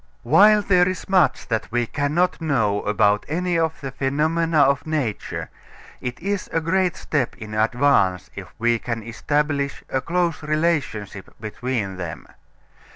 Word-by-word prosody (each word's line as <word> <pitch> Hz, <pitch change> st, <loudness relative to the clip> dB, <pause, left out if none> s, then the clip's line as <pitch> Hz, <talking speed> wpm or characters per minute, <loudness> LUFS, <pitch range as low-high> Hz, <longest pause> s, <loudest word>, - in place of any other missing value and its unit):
While 210 Hz, +1 st, +6 dB
there 180 Hz, -2 st, +4 dB
is 185 Hz, -, -5 dB
much 175 Hz, -9 st, +2 dB
that 110 Hz, -2 st, -2 dB
we 120 Hz, 0 st, +1 dB
cannot 150 Hz, +8 st, 0 dB
know 110 Hz, -10 st, +1 dB
about 105 Hz, 0 st, +2 dB
any 175 Hz, +2 st, 0 dB
of 160 Hz, -1 st, -1 dB
the 135 Hz, -2 st, -5 dB
phenomena 155 Hz, +4 st, +1 dB
of 140 Hz, +2 st, +2 dB
nature, 145 Hz, -9 st, -3 dB, 0.5 s
it 125 Hz, -1 st, -5 dB
is 200 Hz, +2 st, -3 dB
a 165 Hz, -, +1 dB
great 180 Hz, +2 st, +1 dB
step 140 Hz, -6 st, -2 dB
in 110 Hz, -1 st, -8 dB
advance 110 Hz, -, +2 dB
if -, -, -8 dB
we 120 Hz, 0 st, +1 dB
can 115 Hz, -2 st, -4 dB
establish 140 Hz, +4 st, -1 dB
a 130 Hz, -, -1 dB
close 170 Hz, 0 st, -1 dB
relationship 150 Hz, -, -1 dB
between 110 Hz, -2 st, -3 dB
them. 85 Hz, -4 st, -6 dB
140 Hz, 145 wpm, -22 LUFS, 115-165 Hz, 0.5 s, While